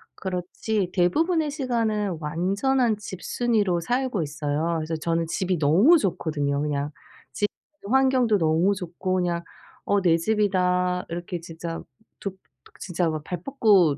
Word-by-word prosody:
그렇지 185 +2 -2
대부분의 305 - +2
시간은 225 - -1
완전한 200 - +1
집순이로 205 -1 0
살고 245 -1 0
있어요. 150 +2 -1
그래서 160 +1 -2
저는 165 +1 -1
집이 185 +1 -1
너무 190 - +6
좋거든요 150 - -1
그냥. 145 -1 -1 0.4
집 205 - +1 0.4
환경도 255 -3 +3
너무 165 +4 +3
좋고 185 0 -3
그냥 175 -2 0 0.4
'어 200 0 +2
내 170 -3 +4
집이다.' 180 -2 +1
이렇게 175 +1 -4
진짜 165 0 -6 0.4
두 195 -1 -5 0.4
진짜 175 -2 -1
막 155 -1 -3
발 180 -1 -5
뻗고 200 - +4
180 Hz, 275 characters per minute, -25 LUFS, 165-215 Hz, 0.4 s, 너무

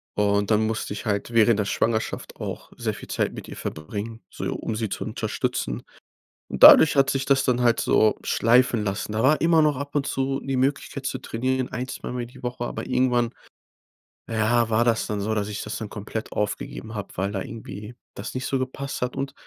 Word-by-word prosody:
Und 100 +1 +2
dann 110 +1 +4
musste 110 -2 -2
ich 105 - -7
halt 100 +2 -1
während 115 -1 +5
der 105 - +1
Schwangerschaft 110 +2 -1
auch - - -6
sehr - - -2
viel - - -10
Zeit - - 0
mit - - -8
ihr - - -8
verbringen, 105 +8 -6
so - - -6
um 110 - -3
sie 110 -2 -2
zu - - -4
unterstützen. - - -2 0.7
Und - - -5
dadurch 155 - +10
hat 135 -1 +4
sich 135 0 0
das 135 -1 +3
dann 125 -1 +2
halt 120 -1 +3
so 110 - +3
schleifen 120 -1 +3
lassen. 105 +1 -3
Da 110 +2 0
war 150 +4 +4
immer 165 -1 +5
noch 150 -3 +2
ab 140 +1 -6
und 140 -2 +1
zu 135 0 -1
die 135 -1 -2
Möglichkeit 135 +2 -1
zu - - -2
trainieren, 130 +2 -1
1, 125 +1 -3
2 - - -6
Mal - - -4
mehr 120 - -2
die 130 +1 -16
Woche, 120 0 -3
aber - - -5
irgendwann, 125 -2 +2 1.0
äh, 115 - -3
ja, 115 +1 +3
war 115 +1 +3
das 115 -1 +1
dann 105 -1 -2
so, 110 +2 -1
dass 105 -2 -1
ich 105 -1 -4
das - - -4
dann 110 -2 -6
komplett 105 +1 -6
aufgegeben 110 +2 -3
hab, 100 -3 -7
weil 100 +2 0
da 95 - -3
irgendwie 105 +2 -8 0.2
das 100 - -6
nicht 130 +1 -3
so 135 - 0
gepasst 135 +2 -4
hat. 125 0 -2
Und 135 0 -3
115 Hz, 220 wpm, -24 LUFS, 105-130 Hz, 1.0 s, dadurch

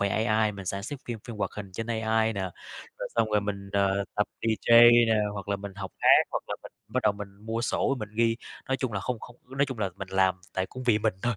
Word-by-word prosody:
về 100 - +2
AI 110 0 +2
mình 100 -1 -8
sản 100 +1 -2
xuất 140 +4 -6
phim 120 -2 -4
phim 115 - -6
hoạt - - -1
hình 100 -3 -7
trên 115 +4 -4
AI 110 -1 +1
nè, 100 - -3 0.6
rồi - - -4
xong 115 -2 +2
rồi 105 -1 +3
mình, 100 -1 -5
ờ, 100 0 +2
tập 105 0 +1
DJ 115 +1 +6 0.2
nè 110 - +3 0.2
hoặc 100 -1 -7
là 100 - +1
mình 100 0 -8
học 95 -1 -7
hát - - +2 0.2
hoặc - - -2
là - - -2
mình - - -11 0.2
bắt - - 0
đầu - - +4
mình 100 0 -7 0.2
mua 115 +1 -1
sổ 125 +3 +1
mình 105 - -5
ghi, 115 0 +3 0.3
nói 135 - +1
chung 130 -3 -2
là, 100 - -2
không 125 +1 -3
không 120 - -11
ư, 130 - -10
nói 140 +1 +3
chung 130 -4 -6
là, 100 -3 0
mình 95 -1 -6
làm 95 -1 +3 0.2
tại 95 0 0
cũng 130 - -8
vì 115 -4 +3
mình 110 -3 +1
thôi, 120 -2 +1
110 Hz, 270 wpm, -28 LUFS, 100-115 Hz, 0.6 s, DJ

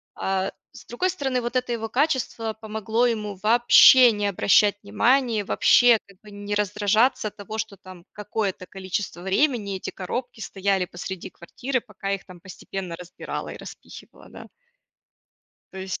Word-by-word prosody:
а. 190 0 -2 0.2
С - - -14
другой 360 +11 -1
стороны, 265 -8 -2
вот 240 +1 -5
это 250 -1 0
его 225 -1 -4
качество 250 -5 -1
помогло 220 +2 0
ему 210 -3 -2
вообще 240 +2 +7
не 205 -1 -1
обращать 200 +1 +3
внимания, 230 +1 +1
вообще 240 +4 +5
как 195 -2 -20
бы 215 - -15
не 205 0 -6
раздражаться 210 +4 +1
от - - -28
того, 205 +2 -7
что 220 -2 -4
там 185 -2 -14
какое-то 205 -3 -4
количество 190 -1 -5
времени 200 -1 0
эти - - -6
коробки 220 +5 -6
стояли 195 -2 -1
посреди 180 +1 -8
квартиры, 255 +8 -4
пока 200 -3 -6
их 195 -1 -3
там 180 -2 -14
постепенно 185 0 -7
разбирала 180 0 -7
и - - -8
распихивала, - - -13
да. - - -11 1.3
То 190 - -9
есть, 190 0 -5
210 Hz, 155 wpm, -24 LUFS, 190-240 Hz, 1.3 s, вообще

